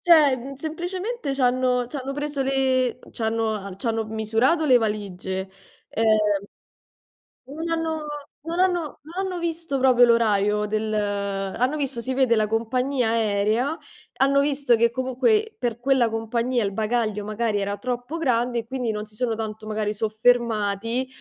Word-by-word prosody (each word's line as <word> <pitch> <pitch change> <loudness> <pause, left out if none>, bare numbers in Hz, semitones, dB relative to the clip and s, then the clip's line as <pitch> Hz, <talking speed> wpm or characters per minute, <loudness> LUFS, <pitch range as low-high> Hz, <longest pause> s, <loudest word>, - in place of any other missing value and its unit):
cioè, 310 -6 +6
mhmm, 270 +3 -7
semplicemente 350 - -4
c'hanno 250 -1 +2
c'hanno 275 -1 -5
preso 290 -1 -3
le 260 -2 +1
c'hanno 220 -3 -2
c'hanno, 225 +1 -1
m 220 - -7
misurato 225 +9 +2
le 255 -4 +6
valigie. 190 -3 -3 0.4
Ehm 210 -3 +2 1.0
non 320 +4 -5
hanno 320 -2 -2 0.4
non 335 +1 -3
hanno 365 -2 +3 0.2
non 355 +6 -4
hanno 365 -2 -3
visto 330 -4 -2
proprio 255 -2 +4
l'orario 210 -3 +3
del 215 +1 -2
hanno 205 +5 -1
visto 270 -4 -2
si 260 - -2
vede 255 -3 +3
la 215 - +2
compagnia 245 +3 0
aerea, 225 +5 +1 0.4
hanno 275 +1 +4
visto 280 -3 +2
che 235 +1 +3
comunque 265 - +1
per 240 -2 -2
quella 255 -1 +3
compagnia 235 +2 -1
il 200 - -1
bagaglio 215 0 -1
magari 215 0 -1
era 200 +1 -2
troppo 250 +4 -4
grande, 245 -5 +1
e 230 - -4
quindi 250 -1 -2
non 210 0 -4
si 210 - -13
sono 230 +1 -1
tanto 220 -1 -5
magari 215 -1 -1
soffermati, 225 +1 +1
240 Hz, 145 wpm, -24 LUFS, 215-275 Hz, 1.0 s, cioè